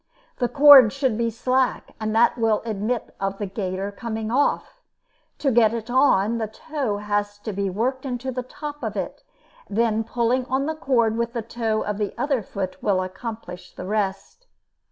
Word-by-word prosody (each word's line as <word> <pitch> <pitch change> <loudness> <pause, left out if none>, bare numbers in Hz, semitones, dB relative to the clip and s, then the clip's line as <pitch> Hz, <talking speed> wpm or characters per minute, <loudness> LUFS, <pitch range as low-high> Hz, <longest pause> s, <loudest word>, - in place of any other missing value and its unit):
The 245 - 0
cord 280 -6 +9
should 270 -4 0
be 230 +1 0
slack, 255 +3 0
and 215 0 -2
that 230 +1 +4
will 225 -3 +1
admit 220 +2 -2
of 195 0 -2
the 205 - -3
gaiter 195 0 -3
coming 220 +1 -4
off. 285 - 0 0.6
To 275 - +1
get 230 -1 +4
it 230 +1 -5
on, 235 -4 +3
the 220 - -1
toe 255 -1 -3
has 205 0 -2
to 205 +1 -6
be 200 0 -1
worked 250 +7 -1
into 260 -1 -3
the 250 0 -3
top 295 +3 -8
of - - -4
it, - - -4 0.5
and 205 - -6
then 225 -1 +2
pulling 240 +2 0
on 265 +2 0
the 315 - -1
cord 235 -7 +1
with 235 0 -1
the 235 -3 -3
toe 225 -1 -1
of 210 0 -3
the 205 -2 -2
other 275 -4 0
foot 190 -1 -5
will 190 -2 +1
accomplish 185 -2 -8
the - - -7
rest. 205 - -3
225 Hz, 185 wpm, -23 LUFS, 205-255 Hz, 0.6 s, cord